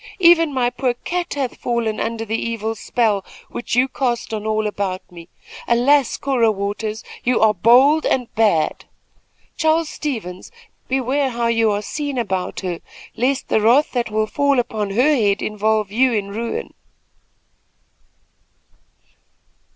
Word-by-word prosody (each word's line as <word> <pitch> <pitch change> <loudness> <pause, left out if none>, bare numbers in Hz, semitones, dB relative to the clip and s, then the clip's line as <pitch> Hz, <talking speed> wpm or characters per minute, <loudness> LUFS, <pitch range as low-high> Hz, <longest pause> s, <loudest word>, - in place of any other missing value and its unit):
Even 335 -4 +5
my 250 -3 0
poor 245 -1 -1
cat 350 +7 -4
hath 270 -3 -3
fallen 235 -3 -1
under 225 0 -3
the 220 +1 -2
evil 225 -1 -2
spell 220 -3 0 0.3
which 240 - -3
you 250 +2 +4
cast 245 -4 -2
on 215 0 -3
all 215 0 0
about 195 -3 -3
me. 170 -1 -12 0.4
Alas, 255 +3 +3
Cora 255 -5 +2
Waters, 210 +2 -4 0.2
you 250 0 +2
are 220 -1 +4
bold 255 - +5
and 250 -3 -1
bad. 205 -9 +1 0.7
Charles 320 0 +1
Stevens, 215 - -5 0.4
beware 265 +1 0
how 235 -1 -2
you 230 -1 +2
are 205 0 -1
seen 285 +4 -4
about 190 -6 -2
her, 180 -3 -3 0.4
lest 265 +3 -1
the 220 - +2
wrath 245 +7 +4
that 240 -3 -1
will 215 0 0
fall 280 +4 +1
upon 220 -4 -1
her 255 +9 +3
head 205 -5 +2
involve 215 -1 0
you 255 +4 +3
in 205 -2 -1
ruin." 230 +3 -4
230 Hz, 145 wpm, -20 LUFS, 210-265 Hz, 0.7 s, Even